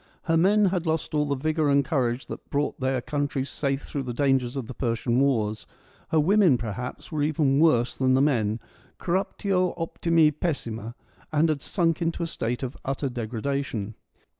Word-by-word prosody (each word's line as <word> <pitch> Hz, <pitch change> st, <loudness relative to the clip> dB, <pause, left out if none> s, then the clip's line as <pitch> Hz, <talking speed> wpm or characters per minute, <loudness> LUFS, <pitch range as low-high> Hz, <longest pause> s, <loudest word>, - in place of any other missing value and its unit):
Her 165 Hz, -, +1 dB
men 200 Hz, +5 st, +4 dB
had 180 Hz, -3 st, 0 dB
lost 160 Hz, 0 st, -1 dB
all 150 Hz, -1 st, +1 dB
the 140 Hz, -, 0 dB
vigour 155 Hz, +2 st, 0 dB
and 140 Hz, -1 st, +3 dB
courage 130 Hz, -5 st, 0 dB
that -, -, -9 dB
brought 145 Hz, +1 st, -1 dB
their 130 Hz, -1 st, 0 dB
country 145 Hz, -1 st, -2 dB
safe 140 Hz, 0 st, -2 dB
through 140 Hz, -, -4 dB
the 125 Hz, -3 st, -5 dB
dangers 135 Hz, -2 st, +1 dB
of 135 Hz, -4 st, -3 dB
the 130 Hz, -, -7 dB
Persian 120 Hz, 0 st, 0 dB
Wars: 110 Hz, -6 st, +1 dB, 0.4 s
her 160 Hz, -, +3 dB
women, 180 Hz, -3 st, +4 dB
perhaps, 120 Hz, -, -6 dB
were 155 Hz, -2 st, -1 dB
even 145 Hz, -2 st, +2 dB
worse 125 Hz, -7 st, +3 dB
than 130 Hz, -1 st, +2 dB
the -, -, +4 dB
men 115 Hz, -6 st, +1 dB, 0.2 s
— 125 Hz, -, -31 dB
corruptio 185 Hz, 0 st, 0 dB
optimi 165 Hz, -1 st, +2 dB
pessima 120 Hz, -8 st, -4 dB, 0.2 s
— -, -, -30 dB
and 155 Hz, +2 st, +3 dB
had 150 Hz, -3 st, 0 dB
sunk 165 Hz, -1 st, 0 dB
into 170 Hz, 0 st, -1 dB
a -, -, 0 dB
state 120 Hz, -5 st, -3 dB
of 130 Hz, 0 st, -4 dB
utter 135 Hz, +1 st, -2 dB
degradation. 120 Hz, -2 st, -3 dB
140 Hz, 185 wpm, -26 LUFS, 125-160 Hz, 0.4 s, men